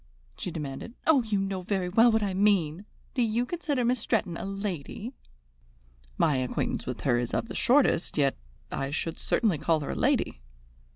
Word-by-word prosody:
she - - -5
demanded. 155 - -6
"Oh, 295 -4 +5
you 220 -3 -1
know 195 -1 -2
very 185 0 -1
well 225 +6 +5
what 220 -1 +2
I 195 -2 -1
mean. 190 -3 +2 0.3
Do 255 - 0
you 230 +1 +1
consider 290 -5 -1
Miss 250 +1 +2
Stretton 185 -5 0
a - - -5
lady?" 195 - -4 1.0
"My 145 -4 +3
acquaintance 130 -1 -2
with 125 -2 -4
her 120 -4 +2
is 120 -1 -2
of - - -1
the - - -5
shortest, 255 - +3
yet 140 -2 +3 0.4
I 135 - -2
should 160 +3 -3
certainly 200 -10 +1
call 155 +1 +2
her 145 - -3
a - - -4
lady." - - +1
195 Hz, 180 wpm, -28 LUFS, 155-230 Hz, 1.0 s, Oh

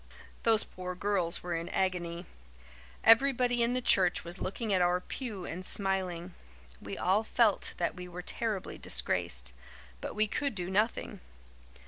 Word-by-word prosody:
Those 225 -2 +4
poor 180 0 -7
girls 185 -3 0
were 175 0 -3
in 165 +1 -3
an - - -6
agony. 175 -2 -1 0.8
Everybody 245 +1 +5
in 235 +1 +2
the 255 - -1
church 185 -5 +4
was 170 +2 -7
looking 210 +2 -2
at 185 - +3
our 180 0 +3
pew 205 -2 -6
and 180 +3 -5
smiling. 185 -3 -1 0.5
We - - -6
all 195 +4 +2
felt 220 -2 +2
that 170 - 0
we 180 0 -8
were 180 0 -8
terribly 215 -1 -3
disgraced; 60 0 +1 0.5
but - - -5
we 215 +1 +3
could 280 +3 -2
do 180 -1 -4
nothing. 210 +4 0
190 Hz, 155 wpm, -31 LUFS, 175-220 Hz, 0.8 s, Everybody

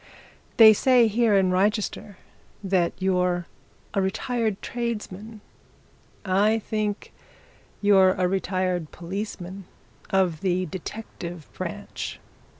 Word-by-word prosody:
They 220 -2 +10
say 250 +2 +4
here 225 0 +2
in 190 -2 +3
Wrychester 200 +1 0 0.5
that 185 -3 +1
you're 180 -2 +1 0.5
a 200 - +1
retired 220 +2 -1
tradesman. 220 -2 -5 0.8
I 205 +4 +3
think 215 -1 -3 0.7
you're 190 -2 +6
a 185 -1 0
retired 185 -3 -1
policeman 190 +1 -6 0.4
of 185 -5 +1
the 185 -1 0
detective 175 -2 -7
branch." - - -6
195 Hz, 95 wpm, -25 LUFS, 185-215 Hz, 0.8 s, They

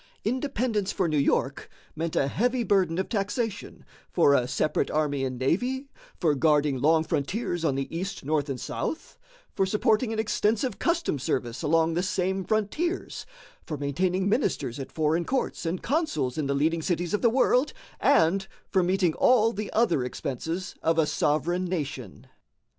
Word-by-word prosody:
Independence 230 -4 -1
for 185 -3 0
New 155 - -1
York 140 0 0 0.3
meant 160 +1 -3
a 135 - +2
heavy 245 - 0
burden 185 -6 +2
of 190 - -1
taxation 215 +1 -3 0.2
for 140 - +4
a 125 -3 +2
separate 150 +3 0
army 145 -3 0
and 130 -1 -2
navy, 250 - -1 0.3
for 160 -5 +3
guarding 145 -2 +2
long 160 +2 +4
frontiers 175 - -2
on 145 -5 +1
the 135 0 -2
east, 185 -3 -4
north, 150 -1 0
and 130 -2 -3
south, 315 - -5 0.4
for - - +2
supporting 220 +4 +1
an 225 - -3
extensive 220 +1 0
customs 335 - 0
service 120 -3 -2
along 165 +1 +2
the 175 - +1
same 190 +1 -1
frontiers, 225 - -2 0.4
for 155 - -5
maintaining 180 +7 0
ministers 145 - 0
at 135 - -6
foreign 160 +2 +1
courts 255 -6 -2
and 175 +2 -3
consuls 295 - 0
in 155 -3 -1
the 140 - 0
leading 160 +4 +1
cities 175 +2 -1
of 210 - +1
the 235 - +5
world, 255 +3 +3 0.3
and 190 +4 +3 0.2
for 190 - +3
meeting 180 -2 +2
all 230 +2 +4
the 210 0 -5
other 210 - +2
expenses 160 +8 -4
of 165 0 +1
a 160 - +4
sovereign 170 +5 0
nation. 140 - -5
175 Hz, 165 wpm, -27 LUFS, 150-215 Hz, 0.4 s, the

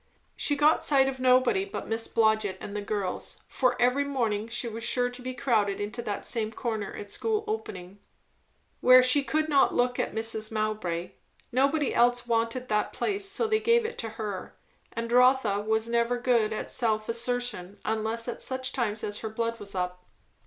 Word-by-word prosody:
She 290 - -1
got 295 +2 +3
sight 270 -2 +4
of 265 -1 -3
nobody 255 +8 +3
but 395 - -6
Miss 225 0 -1
Blodgett 220 -3 +1
and 205 - -7
the 210 - -2
girls; 205 -2 -4
for 250 -2 0
every 250 +3 +3
morning 230 -7 -1
she 240 +1 -2
was 225 0 -5
sure 245 +1 +2
to 245 +1 -10
be 255 0 -5
crowded 215 -6 +1
into 210 +3 -4
that 210 -4 -4
same 220 -3 0
corner 220 -3 -3
at 205 -1 -7
school 440 -1 -1
opening, 200 - -6 0.8
where 255 0 +7
she 255 +3 +4
could 310 +2 0
not 285 -3 +3
look 245 0 +1
at - - -2
Mrs. 220 -1 0
Mowbray; 215 -6 -2 0.4
nobody 275 +3 +2
else 245 +1 +3
wanted 230 +2 -1
that 210 -2 0
place, 395 -1 -1
so 410 +4 0
they 435 0 +2
gave 465 +1 +3
it 455 - -5
to 225 - -3
her; 205 -4 -5 0.3
and 230 0 -4
Rotha 250 -4 +4
was 220 +2 0
never 235 +1 +1
good 240 -3 +2
at 215 - -4
self 215 -3 +1
assertion, 235 -5 -2
unless 220 +1 -1
at 240 - -4
such 260 0 -2
times 220 -4 -2
as 205 0 -3
her 220 - -4
blood 230 +1 -3
was 200 -1 -6
up. 180 0 -3
235 Hz, 185 wpm, -27 LUFS, 215-255 Hz, 0.8 s, where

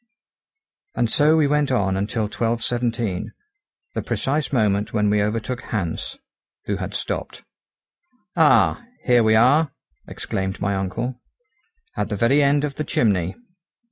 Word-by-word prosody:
And 115 - 0
so 155 +2 +4
we 155 - +4
went 145 -1 +1
on 100 -6 +1
until 105 +3 -1
12.17, 115 -2 -1 0.7
the, - - -2
precise 145 +2 -1
moment 105 -5 +1
when 105 -2 +2
we 105 0 +2
overtook 115 +4 -2
Hans, 105 - -4 0.5
who - - -1
had - - -5
stopped. - - -4 0.9
"Ah! 160 +5 +4 0.2
here 120 -2 +5
we 110 0 +4
are," 140 +7 +4 0.4
exclaimed 95 +1 -4
my 100 0 0
uncle, 100 +7 -3 0.7
"at - - -2
the 105 - -2
very 130 +7 +3
end 145 +1 +3
of 145 -2 -2
the 155 - -1
chimney." 100 - 0
115 Hz, 135 wpm, -22 LUFS, 105-140 Hz, 0.9 s, here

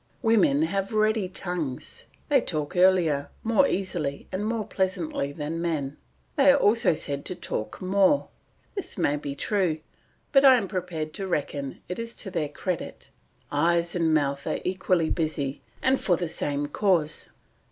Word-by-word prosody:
Women 275 +6 +4
have 195 -8 -1
ready 215 -2 +2
tongues; 175 -8 -4 0.2
they 280 -4 +4
talk 150 -5 -3
earlier, 175 -6 +3
more 230 +5 +4
easily, 170 -7 -2
and 205 +3 -2
more 225 -2 -1
pleasantly 180 -7 -1
than 155 +3 -4
men. 150 -5 -2 0.4
They 280 0 +7
are 275 - +4
also 215 - +4
said 140 -2 -4
to 185 - -3
talk 110 -10 -4
more; 195 +8 +3 0.4
this 395 - -5
may 155 -5 +2
be 145 -1 -5
true, 185 -1 0 0.5
but 275 -1 +6
I 265 -2 +9
am 225 -6 0
prepared 170 -5 -4
to 195 +3 -4
reckon 145 -5 -3
it 180 - -4
to 230 -4 -5
their 160 -5 -1
credit; 180 +2 -5 0.4
eyes 170 +3 +2
and 165 -2 +1
mouth 140 -2 +1
are - - 0
equally 185 -3 +1
busy 145 -4 -1 0.2
and 265 0 +3
for 175 -3 +2
the 175 - -2
same 145 -2 -2
cause. 160 -2 +1
180 Hz, 155 wpm, -26 LUFS, 150-205 Hz, 0.5 s, I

